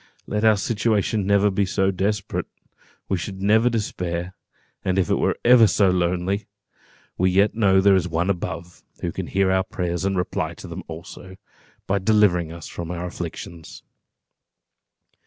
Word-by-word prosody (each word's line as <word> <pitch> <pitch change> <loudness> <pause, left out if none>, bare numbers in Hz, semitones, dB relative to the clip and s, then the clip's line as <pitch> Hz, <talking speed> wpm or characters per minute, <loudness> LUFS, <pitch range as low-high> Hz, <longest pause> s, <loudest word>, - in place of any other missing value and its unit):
Let 105 +1 -2
our 110 -2 +5
situation 105 -1 0
be 100 - +3
ever 100 0 +2
so 95 +1 +1
desperate, 100 +2 -2 0.6
we 95 - 0
should 95 +2 -6
never 110 +4 +4
despair; 90 -6 -3 0.5
and 95 0 0
if 95 -4 +1
it - - +2
were - - +1
ever 120 -2 +7
so 95 0 +3
lonely, 90 +3 -1 0.7
we 95 +1 +3
yet 100 +3 +3
know 100 -4 +3
that 95 - +6
there 100 -1 +6
is 90 -2 +1
One 85 +3 0
above, 85 -1 -5 0.2
who - - -2
can - - -5
hear 95 -1 +1
our 95 0 +2
prayers, 85 -1 -3
and 95 0 0
reply 90 - -2
to - - -10
them - - -6
also, 85 +3 -10 0.5
by 100 +1 0
delivering 95 -5 +3
us 85 -1 -9
from 85 -1 -6
our 90 0 -4
afflictions. 85 -1 -8
95 Hz, 165 wpm, -23 LUFS, 90-100 Hz, 0.7 s, ever